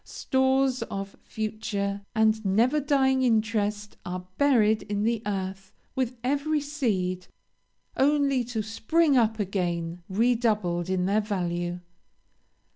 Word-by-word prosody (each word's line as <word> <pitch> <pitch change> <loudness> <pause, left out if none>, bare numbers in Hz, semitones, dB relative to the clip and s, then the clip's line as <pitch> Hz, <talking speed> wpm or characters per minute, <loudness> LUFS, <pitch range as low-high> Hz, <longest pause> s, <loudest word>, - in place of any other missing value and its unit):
Stores 265 -1 +1
of 195 0 -5
future 205 -2 -3
and 220 0 +3
never 230 +9 +3
dying 265 -2 +2
interest 215 -3 0
are 180 0 -5
buried 225 -7 +4
in 205 -1 -3
the 230 0 0
earth 190 -1 -4 0.2
with 255 -1 -1
every 290 +4 +1
seed, 205 -12 -2 0.7
only 275 -2 +2
to 225 -2 -3
spring 280 +8 +2
up 225 -3 +3
again 175 -3 -2
redoubled 210 -5 +1
in 185 -1 0
their 205 +3 +2
value. 175 -4 -2
215 Hz, 115 wpm, -26 LUFS, 195-260 Hz, 0.7 s, buried